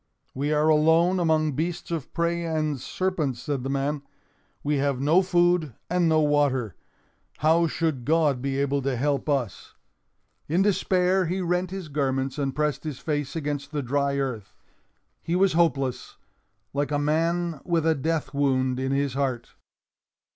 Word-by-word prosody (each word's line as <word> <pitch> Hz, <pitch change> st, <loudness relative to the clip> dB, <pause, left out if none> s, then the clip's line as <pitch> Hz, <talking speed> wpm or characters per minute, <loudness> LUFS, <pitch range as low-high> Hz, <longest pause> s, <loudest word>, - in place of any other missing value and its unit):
"We 145 Hz, +3 st, -2 dB
are 150 Hz, 0 st, +2 dB
alone 160 Hz, +4 st, +4 dB
among 160 Hz, -2 st, +2 dB
beasts 170 Hz, +5 st, -3 dB
of 160 Hz, -5 st, -4 dB
prey 170 Hz, 0 st, -1 dB
and 155 Hz, -4 st, -1 dB
serpents," 155 Hz, -4 st, -2 dB
said 140 Hz, 0 st, -3 dB
the 135 Hz, -, -4 dB
man. 140 Hz, +1 st, -1 dB, 0.6 s
"We 145 Hz, 0 st, +1 dB
have 140 Hz, -2 st, 0 dB
no 155 Hz, +7 st, +4 dB
food 175 Hz, -, +2 dB, 0.2 s
and 175 Hz, -2 st, +2 dB
no 155 Hz, 0 st, +4 dB
water. 145 Hz, -, +1 dB, 0.6 s
How 165 Hz, +3 st, +3 dB
should 155 Hz, -6 st, -1 dB
God 150 Hz, -3 st, +2 dB
be 135 Hz, 0 st, -2 dB
able 140 Hz, 0 st, 0 dB
to 135 Hz, -1 st, -1 dB
help 140 Hz, +4 st, -1 dB
us?" 130 Hz, -9 st, -2 dB, 0.7 s
In 175 Hz, +6 st, +2 dB
despair 185 Hz, -2 st, +2 dB
he 185 Hz, +3 st, -1 dB
rent 180 Hz, 0 st, 0 dB
his 190 Hz, -2 st, -6 dB
garments 135 Hz, -1 st, -1 dB
and 135 Hz, -2 st, -1 dB
pressed 150 Hz, -1 st, -1 dB
his 150 Hz, -5 st, -5 dB
face 145 Hz, 0 st, -3 dB
against 145 Hz, -2 st, -3 dB
the 145 Hz, -2 st, -2 dB
dry 140 Hz, +2 st, 0 dB
earth. 125 Hz, -7 st, -4 dB, 0.7 s
He 170 Hz, -, -2 dB
was 190 Hz, 0 st, +3 dB
hopeless—like 145 Hz, -1 st, -2 dB
a 145 Hz, -, +1 dB
man 165 Hz, +2 st, 0 dB
with 165 Hz, -2 st, 0 dB
a 160 Hz, -, +4 dB
death 155 Hz, -1 st, -2 dB
wound 130 Hz, -2 st, +1 dB
in 130 Hz, 0 st, -1 dB
his 140 Hz, -1 st, 0 dB
heart. 130 Hz, -4 st, -2 dB
150 Hz, 155 wpm, -25 LUFS, 135-165 Hz, 0.7 s, alone